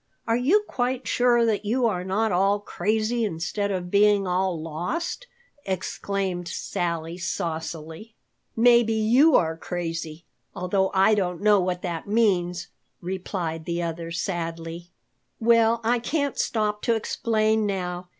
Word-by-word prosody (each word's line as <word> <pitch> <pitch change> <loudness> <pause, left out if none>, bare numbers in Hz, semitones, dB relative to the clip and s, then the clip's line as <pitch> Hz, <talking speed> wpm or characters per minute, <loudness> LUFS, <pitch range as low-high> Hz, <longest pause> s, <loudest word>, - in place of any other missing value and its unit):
Are 230 - +2
you 310 - +3
quite 250 +1 -2
sure 240 -1 +3
that 220 -2 0
you 240 +4 +1
are 185 -6 0
not 205 +4 0
all 195 +3 +2
crazy 215 +4 -1
instead 200 +2 -2
of 180 -2 -3
being 205 -1 +4
all 180 -1 0
lost?" 180 - -4 0.4
exclaimed 190 -1 -3
Sally 170 0 -3
saucily. 165 +3 -5 0.4
"Maybe 235 -1 +5
you 245 +8 +4
are 160 -1 +2
crazy, 165 -1 -5 0.3
although 190 +1 0
I 195 +3 +5
don't 180 -4 0
know 210 -1 +5
what 180 -1 -2
that 170 -2 -4
means," 180 -5 +1 0.3
replied 175 -3 -4
the 170 0 -2
other 165 0 -4
sadly. 170 -1 -4 0.5
"Well, 230 0 +4
I 240 +2 +2
can't 285 +3 -1
stop 210 -2 -1
to 230 - +2
explain 220 -1 +1
now. 180 -2 -4
195 Hz, 130 wpm, -25 LUFS, 175-225 Hz, 0.5 s, Maybe